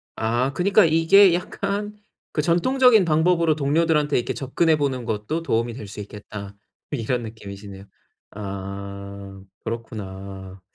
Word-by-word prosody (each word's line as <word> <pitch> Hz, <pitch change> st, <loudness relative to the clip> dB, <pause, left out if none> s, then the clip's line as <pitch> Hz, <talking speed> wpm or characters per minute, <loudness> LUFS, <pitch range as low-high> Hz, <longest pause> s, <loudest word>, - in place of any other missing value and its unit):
아 120 Hz, +4 st, 0 dB
그니까 200 Hz, +3 st, +4 dB
이게 165 Hz, +4 st, +6 dB
약간 200 Hz, +3 st, -3 dB, 0.4 s
그 150 Hz, -, 0 dB
'전통적인 220 Hz, -, +4 dB
방법으로 165 Hz, 0 st, +3 dB
동료들한테 150 Hz, 0 st, +2 dB
이렇게 120 Hz, -, -1 dB
접근해 155 Hz, +4 st, +1 dB
보는 135 Hz, -4 st, -1 dB
것도 115 Hz, +9 st, -2 dB
도움이 115 Hz, -5 st, 0 dB
될 110 Hz, -3 st, -8 dB
수 100 Hz, -, -9 dB
있겠다.' 100 Hz, -1 st, -8 dB, 0.5 s
이런 125 Hz, -2 st, +1 dB
느낌이시네요. 100 Hz, -3 st, -9 dB, 0.5 s
아 100 Hz, 0 st, -7 dB, 0.2 s
그렇구나. 95 Hz, -4 st, -7 dB
120 Hz, 295 characters per minute, -23 LUFS, 100-165 Hz, 0.5 s, 이게